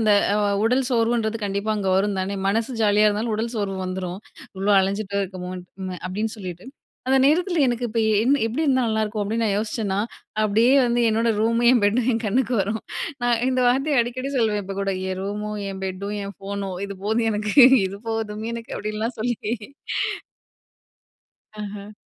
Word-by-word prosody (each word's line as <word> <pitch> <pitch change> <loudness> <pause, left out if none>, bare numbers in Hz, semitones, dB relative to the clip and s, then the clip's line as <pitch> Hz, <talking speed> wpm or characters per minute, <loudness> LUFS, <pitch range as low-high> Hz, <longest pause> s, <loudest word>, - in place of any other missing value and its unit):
அந்த 215 -1 +4 0.5
உடல் 250 +2 +2
சோர்வுன்றது 230 -1 +1
கண்டிப்பா 200 +2 -1
அங்க 195 -2 0
வரும் 200 0 +1
தானே. 195 +2 -2
மனசு 225 +5 0
ஜாலியா 210 0 +5
இருந்தாலும் 215 +2 -1
உடல் 230 +2 -2
சோர்வு 195 -2 -2
வந்துரும். 185 +1 -4 0.4
இவ்ளோ 200 +2 +2
அலஞ்சிட்டு 200 +1 -2
இருக்கமோன்ட்டு 185 0 -7
அப்பிடின்னு 210 +5 -3
சொல்லிட்டு. 180 -3 -7 0.4
அந்த 265 - +4
நேரத்தில 345 +3 +3
எனக்கு 240 0 0
இப்ப 230 0 -3
ஏ - - +3
என்ன 280 +2 +3
எப்பிடி 245 +8 -2
இருந்தா 260 -3 +3
நல்லாயிருக்கும் 220 -1 -1
அப்பிடின்னு 225 +3 -1
நான் 205 -2 +1
யோசிச்சேன்னா, 210 -2 -2 0.5
அப்பிடியே 225 +5 +4
வந்து 240 0 +1
என்னோட 225 +1 +1
ரூமயும், 230 +2 +3
என் 245 - +4
பெட்டையும் 235 +4 +2
என் 225 - -1
கண்ணுக்கு 245 +4 +1
வரும் 205 +3 -1 0.4
நான் 240 -1 +2
இந்த 255 -1 +1
வார்த்தைய 275 +2 +2
அடிக்கடி 255 +3 -4
சொல்வேன். 215 -4 +1
இப்ப 195 +1 -6
கூட 195 0 0 0.2
என் 185 - -3
ரூமும், 210 +1 -4
என் 190 0 -7
பெட்டும், 195 +2 -4
என் 200 -1 -7
ஃபோனும் 195 -1 -5
இது 200 -1 -7
போதும் 225 +2 +1
எனக்கு, 210 0 -2 0.3
இது 195 +1 -7
போதும் 220 -1 -3
எனக்கு 230 -1 -7
அப்பிடின்லாம் 215 +3 -3
சொல்லிட்டே 235 -1 -1 2.1
ஆஹ. 205 0 -7
215 Hz, 165 wpm, -23 LUFS, 200-235 Hz, 2.1 s, ஜாலியா